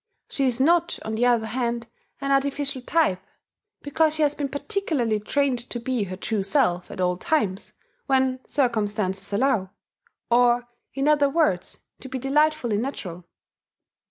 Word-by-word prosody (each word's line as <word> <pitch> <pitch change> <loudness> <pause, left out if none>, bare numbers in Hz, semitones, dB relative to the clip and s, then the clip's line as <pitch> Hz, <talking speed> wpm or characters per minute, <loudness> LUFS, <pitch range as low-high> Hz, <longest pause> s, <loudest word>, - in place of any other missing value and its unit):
She 275 -2 +1
is 250 -1 0
not, 340 +5 +3
on 220 - -3
the 240 +3 +2
other 235 -2 +3
hand, 235 0 -2 0.4
an 275 0 -1
artificial 275 -1 0
type, 250 - +1 0.6
because 310 +2 +2
she 310 - +1
has 290 -1 +3
been 285 -2 -3
particularly 285 - -1
trained 265 +4 0
to 240 - -3
be 240 -3 -1
her 185 -1 -6
true 215 +1 -1
self 180 -2 +1
at - - -9
all 180 -1 +1
times 200 -6 -1 0.3
when 260 -1 +2
circumstances 210 -7 0
allow, 210 -3 +1 0.6
or, 240 0 +4 0.3
in 275 +1 0
other 290 -2 +4
words, 275 - 0 0.2
to 265 - -9
be 260 - -3
delightfully 275 -3 +1
natural. 190 -8 -5
250 Hz, 150 wpm, -24 LUFS, 215-285 Hz, 0.6 s, or